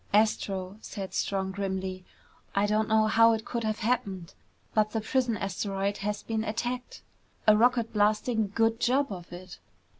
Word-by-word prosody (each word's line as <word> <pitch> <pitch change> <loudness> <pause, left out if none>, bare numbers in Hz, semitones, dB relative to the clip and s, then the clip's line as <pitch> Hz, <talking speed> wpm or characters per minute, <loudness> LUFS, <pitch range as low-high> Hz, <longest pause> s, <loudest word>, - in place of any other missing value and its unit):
"Astro," 200 -2 +1
said 195 -4 -6
Strong 190 -1 -1
grimly, 190 -1 -3 0.5
"I 200 +1 +3
don't 215 +1 +1
know 220 0 +4
how 230 +1 +5
it 220 0 -3
could 235 -1 -3
have 215 0 -2
happened, 210 -7 -1 0.4
but 215 -1 +3
the 225 - 0
prison 240 0 0
asteroid 195 +1 -2
has 210 +1 -3
been 220 -1 -2
attacked. 240 +3 -4 0.4
A 215 -2 +7
rocket 235 0 +3
blasting 215 0 +1
good 225 0 +2
job 260 +1 +2
of 175 -2 -9
it! 180 +1 -10
215 Hz, 155 wpm, -28 LUFS, 195-225 Hz, 0.5 s, A